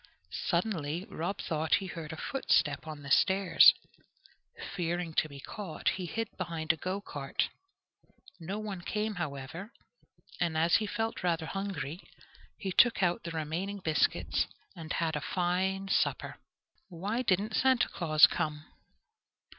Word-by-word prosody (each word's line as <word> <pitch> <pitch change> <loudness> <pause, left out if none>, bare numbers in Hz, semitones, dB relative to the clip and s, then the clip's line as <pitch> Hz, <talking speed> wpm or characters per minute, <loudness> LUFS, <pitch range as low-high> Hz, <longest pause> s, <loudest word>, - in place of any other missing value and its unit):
Suddenly 170 -3 -1
Rob 175 +5 -3
thought 160 0 +1
he 195 - -2
heard 165 -4 -6
a 160 - -7
footstep 155 - +1
on 150 -2 -7
the 140 - -7
stairs. 190 +3 +7 1.0
Fearing 175 -1 -2
to 155 - +1
be 140 -1 -10
caught, 190 +2 -3
he 185 -1 -3
hid 225 +7 -2
behind 165 -3 0
a - - -7
go 185 +5 -3
cart. 140 -8 -2 0.9
No 180 +5 -4
one 210 -4 -5
came, 215 +4 -2
however, 150 - -5 0.7
and 165 -2 0
as 165 +2 +5
he 215 - -2
felt 225 +2 -2
rather 170 -2 0
hungry, 180 -4 -4 0.6
he 195 - -3
took 230 +1 +5
out 175 +5 +2
the 170 - -4
remaining 165 +5 -3
biscuits 160 -5 +1 0.3
and 165 -1 -8
had 165 -2 0
a 150 - -2
fine 190 +3 0
supper. 195 - 0 0.5
Why 200 +7 -2
didn't 210 -1 +1
Santa 260 0 +3
Claus 155 -3 +6
come? 155 -3 -2
175 Hz, 140 wpm, -31 LUFS, 160-195 Hz, 1.0 s, stairs